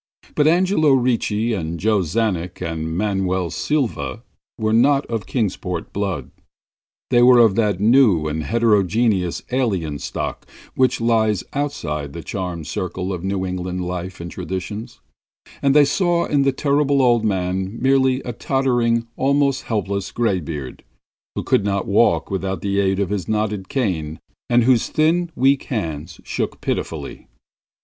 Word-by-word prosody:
But 150 - +3
Angelo 170 -3 +3
Ricci 120 -3 +1
and 85 -4 -3
Joe 105 +2 +2
Czanek 90 -1 -1
and 80 -2 -3
Manuel 95 -3 0
Silva 130 -5 -2 0.3
were 110 -1 0
not 135 +5 +4
of 115 -4 -4
Kingsport 90 -7 -3
blood; 100 -3 -3 0.8
they 120 -1 +5
were 125 0 +7
of 115 -4 +6
that 105 -3 +1
new 105 - +4
and 80 +1 -2
heterogeneous 105 -3 +1
alien 95 - -1
stock - - -5 0.3
which 130 -2 +1
lies 110 -4 +2
outside 80 - -3
the 85 - -7
charmed 90 -5 -4
circle 90 +3 -3
of 90 -1 -5
New 95 -1 -1
England 90 0 -3
life 90 +1 -5
and 85 0 -7
traditions, 100 +6 -6 0.6
and 140 0 +3
they 150 -1 +7
saw 170 +3 +1
in 145 -2 +1
the 135 0 +3
Terrible 140 +1 +1
Old 120 -3 +3
Man 95 +1 -1
merely 130 0 +3
a 120 - -5
tottering, 120 -2 +1
almost 140 0 +1
helpless 100 -3 -2
graybeard, 85 - -2 0.5
who - - -2
could - - +2
not 100 -1 -1
walk 100 -5 +2
without 95 0 -2
the 100 0 0
aid 95 -1 +1
of 100 -1 -1
his 100 -3 -2
knotted 105 -3 -1
cane 85 - -2 0.3
and 120 0 +4
whose 120 -1 +3
thin, 165 +3 +2
weak 135 +2 +2
hands 80 - -4
shook - - -3
pitifully. - - -4
105 Hz, 145 wpm, -21 LUFS, 90-125 Hz, 0.8 s, were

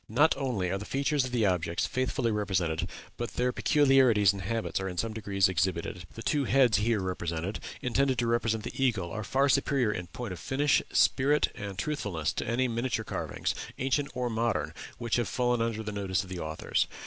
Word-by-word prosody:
Not 145 +9 +4
only 110 -10 -1
are 95 - -1
the - - -6
features 140 +1 +1
of 130 - -5
the 120 -3 +2
objects 90 -3 0
faithfully 130 -2 0
represented, 95 -6 -1 0.3
but 120 - -4
their 125 +1 +1
peculiarities 130 -8 +4
and 100 - -6
habits 115 +3 -2
are 95 0 -3
in 90 - -7
some 110 +4 -1
degree 100 -3 -5
exhibited.... 90 -2 +1
The 115 - -7
two 145 -2 +1
heads 125 -7 +4
here 105 -4 0
presented, 85 +2 -3 0.2
intended 130 +1 +1
to 120 - +1
represent 115 -2 0
the 135 - -3
eagle, 100 -9 +1
are 110 +1 -4
far 135 +7 +2
superior 135 -4 +2
in 90 -4 -4
point 110 +3 -6
of 90 - -8
finish, 140 - +2
spirit, 145 +3 +3
and 100 -2 -6
truthfulness, 95 - -2
to - - -3
any 125 +3 +1
miniature 115 -1 -1
carvings, - - -2 0.2
ancient 140 +2 0
or 125 -1 -1
modern, 115 -3 -1 0.2
which 120 -1 0
have 120 -3 0
fallen 120 -1 +1
under 115 -1 -1
the 105 - -4
notice 95 -2 -1
of 95 - -12
the 90 -1 -5
authors. 80 -1 -1
115 Hz, 195 wpm, -29 LUFS, 95-130 Hz, 0.3 s, Not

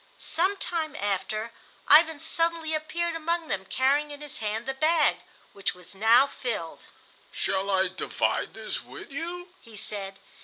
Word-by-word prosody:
Some 375 +4 +1
time 320 -6 -2
after 210 +3 -2 0.4
Ivan 315 +1 +7
suddenly 330 0 0
appeared 330 +2 -1
among 330 0 -1
them 190 -1 -1
carrying 280 +5 +2
in 290 -1 -8
his 295 0 -6
hand 220 +1 -2
the 270 - -2
bag, 310 +3 +3 0.4
which 200 -2 -1
was 180 +1 -10
now 225 +6 +6
filled. 235 -11 -4 0.5
"Shall 195 +1 -1
I 190 -1 +3
divide 185 - -1
this - - -4
with - - -10
you?" 345 +4 -5
he 225 -3 -13
said. 195 -1 -4
280 Hz, 150 wpm, -27 LUFS, 205-325 Hz, 0.5 s, Ivan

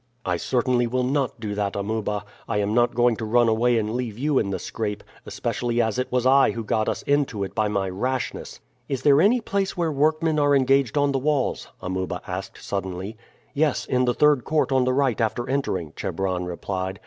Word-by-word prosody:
"I 90 -1 0
certainly 120 +3 +1
will 125 +2 0
not 135 -1 -1
do 105 -2 -4
that, 100 -1 -2
Amuba. 105 0 -2 0.2
I 110 - -1
am 105 0 0
not 120 0 +2
going 120 -1 +3
to 110 - -5
run 120 +2 +3
away 115 +2 +3
and 110 0 -1
leave 120 -4 -3
you 145 +1 +1
in 100 - -1
the 95 - -2
scrape, 105 -2 -4 0.2
especially 120 -1 -2
as 110 +1 +1
it 125 - -2
was 125 0 +1
I 135 +1 +5
who 115 - -4
got 110 +1 0
us - - -3
into 140 -8 0
it 95 - -5
by 110 -1 +1
my 100 -2 -1
rashness." 125 +7 -3 0.3
"Is 135 -2 -2
there 145 0 +6
any 230 +6 +4
place 195 -3 -2
where 170 -2 0
workmen 155 +2 +1
are 145 -1 +4
engaged 135 0 +2
on 145 0 +3
the 135 - 0
walls?" 145 -1 0 0.2
Amuba 95 0 -3
asked - - -6
suddenly. 95 +2 -4 0.4
"Yes, 150 -1 +1
in 125 0 +1
the 120 -1 +1
third 150 -4 +4
court 155 -2 0
on 130 -1 +3
the 130 - +1
right 130 -3 +1
after 115 +2 -1
entering," 95 - -2
Chebron 90 0 -2
replied. 95 +1 -4
120 Hz, 205 wpm, -24 LUFS, 105-140 Hz, 0.4 s, there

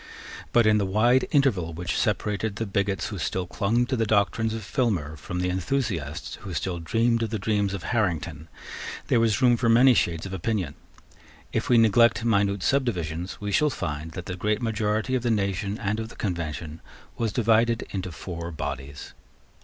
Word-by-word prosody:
But, 120 -1 +4
in 105 0 +4
the 100 - +1
wide 120 +6 +3
interval 105 - +2
which 90 +2 -3
separated 105 0 0
the 115 - -2
bigots 100 -2 -1
who - - -5
still 95 -1 -2
clung 110 +6 +1
to 130 - -1
the 115 -2 0
doctrines 110 +2 +2
of 110 - -5
Filmer 95 - -1
from 90 +3 -5
the 90 - 0
enthusiasts 90 - -2
who - - -6
still 90 -3 -2
dreamed 115 +8 +1
the 115 -1 -1
dreams 100 -1 0
of 95 - -7
Harrington, 85 - -1 0.6
there 120 - +4
was 115 +2 +2
room 120 -1 +5
for 120 -1 +1
many 125 +3 +7
shades 85 -6 0
of 95 - -6
opinion. 95 -4 -2 0.8
If - - -1
we 120 - +6
neglect 115 +1 +4
minute 100 -3 +2
subdivisions, 90 - -1
we 105 0 -3
shall 150 +7 +3
find 80 - -4
that 90 -2 -6
the 90 - -4
great 105 +3 0
majority 110 +2 0
of 130 - +1
the 120 - 0
nation 100 -1 0
and 105 +1 -2
of 110 0 -4
the - - -13
Convention 80 -4 -4 0.4
was 115 -2 0
divided 115 +1 +2
into 95 -2 -4
four 85 0 -6
bodies. 70 -3 -6
105 Hz, 180 wpm, -26 LUFS, 90-115 Hz, 0.8 s, many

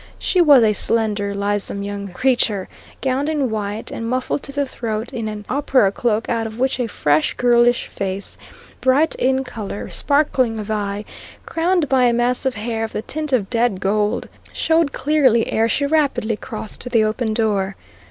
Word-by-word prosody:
She 365 - +2
was 285 -7 +7
a 215 -1 +4
slender, 205 -2 0
lissome 200 0 -1
young 200 0 -5
creature, 210 -1 +1 0.3
gowned 270 +3 0
in 285 -6 0
white, 210 0 -4
and 230 0 -4
muffled 255 +3 -1
to - - -4
the 285 0 0
throat 225 -3 -4
in 225 -2 -3
an 210 -1 -6
opera 260 -6 +2
cloak 225 +1 -1
out 230 -1 -1
of 220 0 -9
which 260 +1 0
a 245 - 0
fresh, 150 -7 +1
girlish 240 0 +3
face, 195 0 -4 0.4
bright 275 +5 +3
in 265 +1 +1
colour, 220 -5 -6
sparkling 270 -5 +2
of 215 0 -5
eye, 205 0 -2 0.4
crowned 335 -1 +1
by 260 -1 +3
a 240 - +3
mass 245 +2 +1
of 260 - -1
hair 225 +1 -3
of 225 - -4
the 210 - -3
tint 305 +4 -4
of 225 -7 +1
dead 235 -5 +1
gold, 210 +2 0 0.2
showed 320 -2 +1
clearly 265 -7 +3
ere 225 +1 +2
she 285 - +1
rapidly 280 -7 +1
crossed 215 0 -7
to 245 - -5
the 230 -3 +3
open 220 +1 -1
door. 205 -4 0
230 Hz, 180 wpm, -20 LUFS, 210-265 Hz, 0.4 s, was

